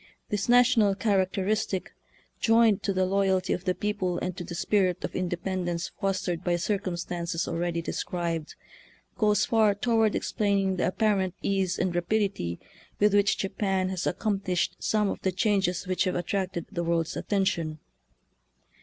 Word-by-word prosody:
This 210 +1 -2
national 240 -5 +5
characteris 195 0 +1
tic, 190 -2 -4 0.5
joined 225 -3 +4
to 200 - -1
the 185 -1 +1
loyalty 190 -1 +1
of 180 - -4
the 185 -1 +1
people 200 -4 -1
and 180 0 -3
to 180 - -5
the 175 - -7
spirit 185 -1 +1
of - - -4
independence 180 -1 -2
fostered 185 -3 -1
by 175 -1 +1
circumstances 175 -3 -2
already 170 0 -2
described, 165 -2 -3 0.6
goes 210 -2 +3
far 215 -3 +3
toward 225 0 +2
explaining 200 -3 0
the 175 - +1
apparent 190 -2 +1
ease 190 -2 0
and 185 -1 0
rapidity 175 - -1 0.4
with 210 0 +4
which 205 -1 +3
Japan 195 -1 -1
has 185 -1 -2
ac - - -1
complished 195 -4 0
some 210 -1 +1
of - - -3
the 190 - +1
changes 190 -1 +1
which 185 +1 0
have 185 - 0
attracted 180 -1 -2
the 170 - -2
world's 165 -1 0
attention. 190 -6 -1
190 Hz, 150 wpm, -27 LUFS, 175-205 Hz, 0.6 s, national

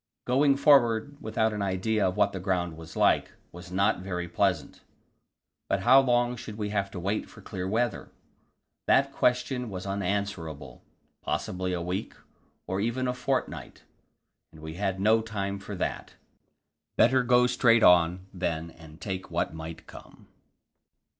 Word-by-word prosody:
Going 140 +2 +3
forward 140 -2 +4
without 110 0 0
an 105 - -3
idea 100 +2 0
of 90 +2 -3
what 100 -1 +3
the 95 - -4
ground 90 -3 -1
was 80 0 -11
like, - - +2 0.2
was 90 +1 -11
not 100 +3 +2
very 90 -2 -4
pleasant. 90 -3 -1 0.9
But 95 - +1
how 125 +6 +7
long 120 -1 +1
should 110 -3 -8
we 105 -1 -3
have 100 -1 -1
to 95 - -7
wait 100 +4 -2
for - - -14
clear 95 -1 -5
weather? 115 +2 -1 0.8
That - - +4
question 125 0 0
was 95 -2 -6
unanswerable; 95 -8 -3 0.4
possibly 90 0 -2
a 85 -1 -2
week, 90 +4 -4 0.5
or 95 +1 -2
even 120 +4 -1
a 125 - 0
fortnight, 125 +2 -3 0.7
and 80 - -15
we 80 0 -7
had 95 +1 -2
no 110 +3 +4
time 100 -3 -4
for 100 +1 -7
that. 90 - -4 0.8
Better 130 +2 +5
go 125 0 +4
straight 120 -2 +4
on, 90 +1 +5
then, 85 -3 -3
and 80 -1 -15
take 95 -2 -5
what - - -1
might 80 0 -8
come. - - -14
100 Hz, 155 wpm, -27 LUFS, 90-115 Hz, 0.9 s, how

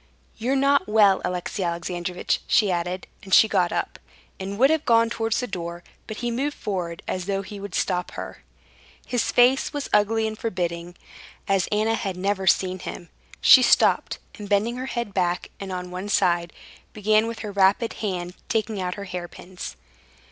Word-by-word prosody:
—"You're 250 +5 -1
not 280 +1 +3
well, 205 -3 +5
Alexey 180 +2 -3
Alexandrovitch," 175 +1 -2
she 205 -3 +3
added, 180 +1 -2 0.2
and 190 -3 +2
she 220 - +7
got 185 -5 +1
up, - - -3 0.4
and 195 +1 -5
would 270 +5 +5
have 315 -1 +1
gone 230 -1 +3
towards 225 -1 0
the 250 - -1
door; 170 -5 -6 0.2
but 220 - -6
he 240 - 0
moved 280 +5 -2
forward 175 -5 -4
as 185 0 -3
though 195 -1 -1
he 205 +1 -9
would 195 -2 -7
stop 180 -1 0
her. - - -7 0.6
His 245 -2 0
face 255 +4 +4
was 290 -1 -4
ugly 220 +2 +3
and 220 0 -3
forbidding, 175 -5 -3 0.5
as 195 -2 +1
Anna 215 +2 +2
had 195 -5 -3
never 190 0 -1
seen 185 0 +2
him. 175 -1 -8 0.3
She 260 - +9
stopped, 250 - +3 0.2
and 205 -1 -7
bending 215 +4 +2
her 260 +1 -4
head 235 -5 -3
back 180 -2 0
and 195 -1 -6
on 180 -1 -5
one 185 +3 -5
side, 175 -4 +2 0.4
began 215 +1 +2
with 230 0 -5
her 210 - -4
rapid 200 +3 +3
hand 180 -4 -3 0.2
taking 220 -3 -1
out 180 0 -2
her 200 - -7
hairpins. 180 0 -7
200 Hz, 175 wpm, -24 LUFS, 180-225 Hz, 0.6 s, She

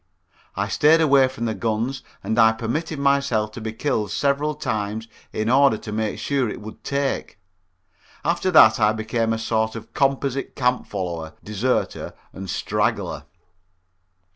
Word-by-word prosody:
I - - -1
stayed 155 +2 +4
away 140 -4 +5
from 130 -2 -5
the 110 - -1
guns 115 +4 -2 0.2
and 110 +1 0
I 110 0 +6
permitted 145 +8 -3
myself 140 -6 +1
to 115 - -8
be 110 0 -3
killed 110 -3 -1
several 145 +4 0
times 110 -5 -3 0.2
in 110 - -2
order 135 -1 +5
to 105 - -8
make 110 0 -2
sure 135 -5 0
it - - -6
would 110 +1 -10
take. 140 -5 -2 0.9
After 170 +3 +1
that 120 -12 +7
I 105 -1 +4
became 110 +1 -1
a 115 - 0
sort 110 0 -1
of 115 0 -9
composite 135 -1 0
camp 125 -1 0
follower, 85 -5 -4
deserter 110 +5 -1 0.2
and 95 0 -7
straggler. - - -1
115 Hz, 150 wpm, -23 LUFS, 110-140 Hz, 0.9 s, that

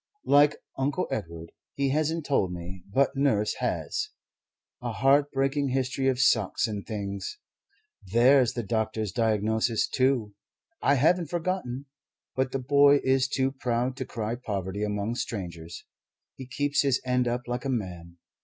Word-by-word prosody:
like 145 +1 +5 0.2
Uncle 145 +7 0
Edward. 85 -5 -5 0.2
He 140 -1 +1
hasn't 155 +2 0
told 115 -11 +1
me, 90 +1 -7
but 135 +6 +2
Nurse 130 -7 +2
has 430 - -2 0.7
a - - -3
heart 140 +2 +3
breaking 135 +1 0
history 130 +1 -1
of 130 -2 +2
socks 110 -6 +3
and 105 -2 -4
things. 100 - -5 0.7
There's 125 +1 +5
the 120 - -3
doctor's 110 -1 -1
diagnosis, 110 +1 +1
too. 130 -6 +1 0.5
I 140 - +4
haven't 165 +5 +3
forgotten. 165 -7 -3 0.5
But 130 -1 0
the 135 - -1
boy 140 +2 +5
is 130 0 +3
too 135 -1 0
proud 125 -1 -1
to 130 - -3
cry 115 -2 -3
poverty 100 0 -3
among 105 +1 -1
strangers. 85 -6 -6 0.5
He 130 - -9
keeps 145 +3 +1
his 135 -3 +2
end 125 -1 +1
up 120 +1 -1
like 120 0 -3
a 135 - -2
man. 90 -8 -4
125 Hz, 145 wpm, -27 LUFS, 105-140 Hz, 0.7 s, like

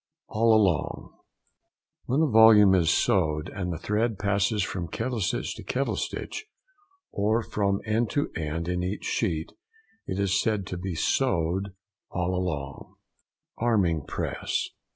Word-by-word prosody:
ALL 115 +1 +3 1.5
ALONG.—When 140 +6 +2
a 150 - +1
volume 110 -3 +7
is 85 -4 +3
sewed, 80 -3 +1
and 90 -2 -4
the 85 - -3
thread 110 +3 -1
passes 100 +1 +1
from 90 -2 -4
kettle 115 +7 -3
stitch 90 - -1
to - - -9
kettle 135 +2 -1
stitch, - - -5 0.6
or 110 +3 +1
from 100 -2 -1
end 110 +1 +1
to 145 -1 -1
end 80 +1 -3
in 90 0 -1
each 95 +3 -3
sheet, 85 -7 -1 0.6
it 95 - -3
is 100 0 +1
said 105 -4 0
to 90 - -5
be 90 -1 -4
sewed 95 -1 0 0.3
"all 90 0 -1
along." 75 -7 -4 0.6
ARMING 95 - +2
PRESS. - - -2
100 Hz, 135 wpm, -26 LUFS, 90-110 Hz, 1.5 s, volume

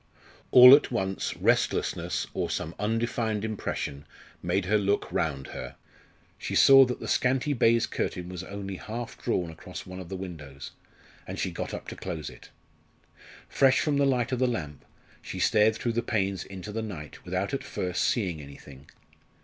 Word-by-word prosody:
All 125 +1 +10
at 145 - +6
once 95 -5 -2
restlessness, - - 0
or - - -2
some 80 - -3
undefined 110 0 -1
impression, 75 -9 -4 0.3
made 90 +2 0
her 105 +3 +2
look 100 0 0
round 70 -4 -2
her. - - -7 0.6
She - - -4
saw 135 -1 +8
that 125 0 -4
the - - -6
scanty 130 +3 +1
baize 115 -2 +3
curtain 90 -1 -3
was 90 0 -6
only 100 -1 -6
half 115 +4 -6
drawn 90 -8 -1
across 80 - -9
one 95 0 -8
of 90 -2 -9
the 95 - -4
windows, 80 -7 -8 0.6
and - - -6
she - - -2
got - - -5
up - - -7
to - - -7
close 80 -6 -5
it. - - -15 1.0
Fresh 135 -1 +3
from 150 -2 +1
the 140 0 +3
light 125 -1 +1
of 130 - -1
the 130 - +3
lamp, 75 - -4 0.4
she - - -7
stared 110 0 +3
through 120 +1 -2
the 120 - 0
panes 100 -5 -1
into 95 +1 -8
the 110 +2 -3
night 90 -9 -8
without 95 +7 -2
at 135 0 -2
first 90 -9 -2
seeing 90 -10 0
anything. 70 -1 -13
100 Hz, 175 wpm, -27 LUFS, 90-120 Hz, 1.0 s, All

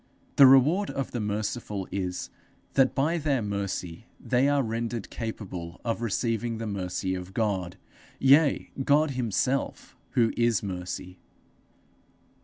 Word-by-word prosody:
The 135 - +10
reward 150 +10 +5
of 135 - -3
the 120 - -3
merciful 105 -1 -3
is, 90 -1 -3 0.4
that 135 -1 +3
by 160 +5 +1
their 140 -6 0
mercy 100 -1 -4
they 130 +2 +2
are 145 -1 +2
rendered 115 -1 -3
capable 95 -7 -6
of 115 0 -1
receiving 115 +1 -1
the 115 - -4
mercy 95 -2 -2
of 90 +1 -6
God 95 -6 -1 0.4
yea, 140 +2 +4
God 145 +2 +3
himself, 125 +2 -1 0.2
who 115 -2 +3
is 115 -3 +2
Mercy. 90 -1 -6
115 Hz, 125 wpm, -27 LUFS, 95-130 Hz, 0.4 s, The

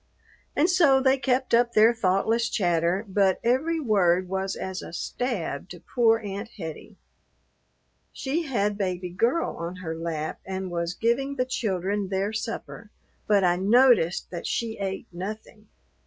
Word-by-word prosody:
And 300 +4 +3
so 330 -7 +5
they 265 0 +3
kept 255 0 0
up 235 0 +4
their 220 +2 +6
thoughtless 225 +3 +1
chatter; 175 +1 +1
but 195 -1 +2
every 295 +8 +1
word 185 - +2
was 190 +1 -2
as 190 -1 -5
a - - -9
stab 185 - -3
to 175 - -9
poor 225 +4 +2
Aunt 205 0 -6
Hettie. 160 -5 -8 1.1
She 285 +5 -2
had 210 -5 0
Baby 180 -2 -2
Girl 235 - 0
on 170 +2 -5
her 170 -3 -5
lap 160 -2 -4
and 190 -1 -5
was 170 0 -2
giving 270 +5 0
the 255 -2 0
children 200 -4 -2
their 195 +2 -1
supper, 220 -1 -5 0.4
but 205 -2 +4
I 175 -1 +3
noticed 205 -3 +3
that 175 - -5
she 225 -2 -2
ate 195 -1 -3
nothing. 210 +4 -7
205 Hz, 150 wpm, -26 LUFS, 180-235 Hz, 1.1 s, their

